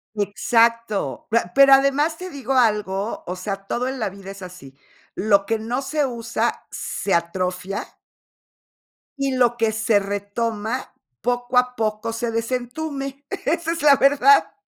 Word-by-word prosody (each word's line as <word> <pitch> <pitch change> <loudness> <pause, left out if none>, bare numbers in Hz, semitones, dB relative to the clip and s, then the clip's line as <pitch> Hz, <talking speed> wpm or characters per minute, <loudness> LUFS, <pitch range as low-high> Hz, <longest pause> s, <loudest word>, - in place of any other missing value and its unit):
Exacto. 220 - +1
Pra 225 -5 +1
¿pero 275 0 +8
además 280 +4 +3
te 370 0 -7
digo 270 -4 -4
algo?, 210 -4 +1
o 180 - -4
sea, 195 +1 -5
todo 245 +5 -2
en 265 0 -4
la 215 - -1
vida 195 0 -11
es 195 - -11
así. 155 -7 -11 0.4
Lo 200 -1 +3
que 225 - 0
no 240 +5 -2
se 290 +1 0
usa 235 -2 -2
se 200 - -3
atrofia 180 +3 -1 1.3
y 275 -1 0
lo 240 -2 +3
que 225 -2 +2
se 220 -1 +2
retoma 205 +4 -3 0.3
poco 245 +1 -1
a 250 0 +3
poco 220 0 -2
se 230 0 -2
desentume. 270 +4 -4 0.2
Esa 330 +2 0
es 335 -2 -3
la 290 -2 +7
verdad. 285 +10 +4
230 Hz, 145 wpm, -22 LUFS, 205-270 Hz, 1.3 s, pero